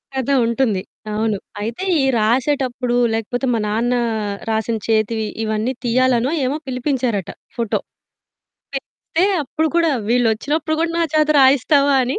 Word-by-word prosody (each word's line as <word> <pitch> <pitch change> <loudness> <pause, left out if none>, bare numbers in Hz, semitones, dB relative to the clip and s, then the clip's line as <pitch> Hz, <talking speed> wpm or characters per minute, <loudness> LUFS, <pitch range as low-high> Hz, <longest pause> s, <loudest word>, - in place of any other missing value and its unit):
కథ 265 0 -2 0.2
ఉంటుంది. 230 -4 +1 0.3
అవును. 215 -1 0 0.2
అయితే 230 - -4 0.2
ఈ - - +1
రాసేటప్పుడు 250 +2 +1 0.2
లేకపోతే 225 +4 -2
మా 230 - +1
నాన్న 230 +4 0 0.6
రాసిన 220 +1 0
చేతి 220 0 +1 0.3
ఇవన్నీ 220 +3 -1
తీయాలనో 250 +1 +2
ఏమో 275 +4 -1
పిలిపించారట 250 - -1 0.3
ఫోటో. 230 -3 0 1.0
చెప్తే 320 +5 -2 0.2
అప్పుడు 315 +4 -1
కూడా 335 -1 +3 0.2
వీళ్ళొచ్చినప్పుడు 250 +7 +1
కూడా 330 0 +1
నా 335 - +3
చేత 305 -1 +3
రాయిస్తావా 280 +2 +4
అని 255 +3 -2
245 Hz, 125 wpm, -19 LUFS, 225-275 Hz, 1.0 s, రాయిస్తావా